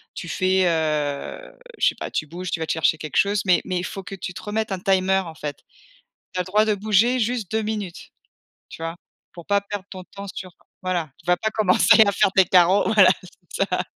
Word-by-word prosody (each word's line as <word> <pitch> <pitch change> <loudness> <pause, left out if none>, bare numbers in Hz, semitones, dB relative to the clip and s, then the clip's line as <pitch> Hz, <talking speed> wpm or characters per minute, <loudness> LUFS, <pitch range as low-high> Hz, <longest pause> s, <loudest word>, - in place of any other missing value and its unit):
tu 175 - -6
fais, 185 +1 +1
heu, 155 -4 -2 0.2
je - - +3
sais - - +1
pas, - - -6
tu - - -2
bouges, 175 +4 -7
tu 165 - -1
vas 160 - -1
te - - -1
chercher 160 0 +2
quelque 155 -1 -5
chose, 205 +1 +2
mais 180 -2 +4
mais 185 -1 -2
il 180 - -2
faut 195 - -6
que 195 +1 -8
tu 180 0 -6
te 185 - -8
remettes 215 0 -3
un 190 - -2
timer 190 0 +2
en 165 -2 -9
fait. 145 -2 -6 0.8
Tu 185 - -5
as - - +2
le - - -16
droit 210 +3 +3
de 215 -1 +1
bouger 215 +5 +2
juste 230 -4 -2
2 220 0 0
minutes, 210 -5 -5 0.6
tu - - -11
vois? 165 +1 -4 0.4
Pour 170 -2 -11
pas 200 0 +2
perdre 200 -1 -6
ton 185 -1 -9
temps 200 +2 -10
sur 185 -1 -7 0.3
voilà, 175 -4 -1
tu - - -22
vas 180 0 +3
pas 220 - -1
commencer 215 +2 +5
à 200 - +2
faire 195 -1 +2
tes 190 - +7
carreaux, 185 +4 +4
voilà, 200 -4 +7 0.4
c'est 195 - 0
ça. 180 - 0
185 Hz, 235 wpm, -23 LUFS, 175-205 Hz, 0.8 s, tes